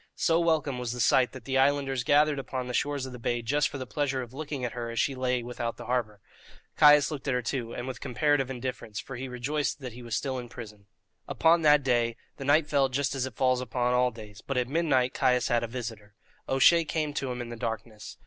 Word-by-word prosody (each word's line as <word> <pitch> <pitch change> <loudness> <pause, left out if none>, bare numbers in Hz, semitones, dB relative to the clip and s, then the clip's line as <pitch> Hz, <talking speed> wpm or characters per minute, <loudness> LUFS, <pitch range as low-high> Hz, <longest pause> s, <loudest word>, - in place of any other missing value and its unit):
So 165 0 +2
welcome 155 -6 +1
was 120 -1 -3
the 125 - -7
sight 125 +1 +4
that 130 -3 -10
the 135 -1 +1
islanders 135 -2 +2
gathered 145 +2 +3
upon 130 -1 -4
the 125 - -5
shores 145 +1 -1
of 130 - -7
the 125 - -9
bay 120 0 -1
just 145 +5 +1
for - - -6
the 130 - -5
pleasure 135 0 -1
of 120 0 -12
looking 145 -2 -4
at 120 - -3
her 120 -1 -5
as 115 - -3
she 140 - +1
lay 125 -1 -1
without 120 -1 -4
the - - -9
harbour. 115 -4 -2 0.6
Caius 150 0 +6
looked 145 -2 -6
at 135 - +1
her, 125 - -1
too, 115 -1 -3
and 120 - -5
with 125 -2 -6
comparative 145 0 +1
indifference, 125 -4 -5
for 135 - -7
he 130 +2 -5
rejoiced 135 +5 -2
that 130 -4 -7
he 125 - -10
was 120 -2 -4
still 130 -2 -2
in 120 -1 -8
prison. 105 -4 -11 0.4
Upon 165 +1 +3
that 150 -2 +5
day 120 -3 +1 0.2
the 135 - -6
night 145 +3 +4
fell 140 -3 +2
just 135 +1 -1
as 130 -1 -1
it 125 - -10
falls 130 0 +2
upon 125 0 -1
all 125 0 +3
days; 110 -2 -12
but 135 - -4
at 125 -1 +1
midnight 135 -4 +1
Caius 125 -1 +2
had 120 0 +2
a - - -2
visitor. 110 -3 -7 0.3
O'Shea 165 +6 +5
came 155 -2 -2
to 135 -2 -2
him 125 - -5
in 120 -1 -5
the 120 - -6
darkness. 115 -2 -6
130 Hz, 245 wpm, -28 LUFS, 120-140 Hz, 0.6 s, Caius